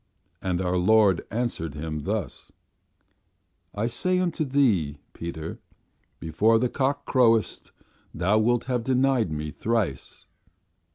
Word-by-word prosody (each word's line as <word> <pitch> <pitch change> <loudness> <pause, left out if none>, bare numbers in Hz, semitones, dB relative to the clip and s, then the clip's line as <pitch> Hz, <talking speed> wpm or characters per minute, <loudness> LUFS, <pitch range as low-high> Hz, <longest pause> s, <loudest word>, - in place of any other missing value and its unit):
And 90 -1 -1
our 90 0 0
Lord 100 0 +4
answered 110 - -3
him 75 -1 -5
thus: 100 - -4 1.2
'I 105 +2 -1
say 185 +10 0
unto 180 -3 0
thee, 115 - +1 0.2
Peter, 80 -1 -6 0.6
before 105 +8 +2
the 125 +2 +1
cock 140 +2 -1
croweth 115 -4 +2 0.4
thou 95 +6 +1
wilt 120 +2 +2
have 125 -2 -2
denied 130 -5 +1
Me 75 0 -4
thrice. 105 - -3
110 Hz, 115 wpm, -25 LUFS, 85-125 Hz, 1.2 s, Lord